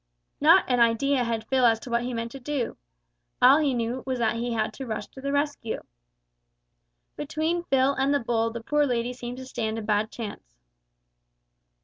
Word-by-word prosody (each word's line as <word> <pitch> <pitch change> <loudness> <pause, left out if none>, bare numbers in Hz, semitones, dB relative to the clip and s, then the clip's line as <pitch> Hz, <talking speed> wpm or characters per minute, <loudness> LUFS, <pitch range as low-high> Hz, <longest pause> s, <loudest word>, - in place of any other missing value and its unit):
Not - - +6
an 250 -1 +2
idea 245 +3 +3
had 230 -2 -2
Phil 265 -1 +2
as 225 -2 +5
to 250 - -8
what 235 0 +2
he 245 +1 -3
meant 230 -1 -4
to 275 - -8
do. 265 -2 -3 0.6
All 265 +4 +7
he 285 -4 +1
knew 235 +2 -2
was 260 -1 -2
that 230 -1 0
he 240 +1 -2
had 220 -1 -1
to 265 - -7
rush 220 -2 -3
to 265 - -12
the 280 +1 -2
rescue! 285 -5 -1 1.3
Between 315 +4 -2
Phil 270 -2 +3
and 275 0 +1
the 285 - +3
bull 230 -2 0
the 230 0 -6
poor 295 +3 +2
lady 245 -1 -1
seemed 245 0 -7
to 260 - -8
stand 225 -3 -3
a 225 - -4
bad 210 +1 +1
chance. 205 - -8
245 Hz, 195 wpm, -26 LUFS, 230-275 Hz, 1.3 s, All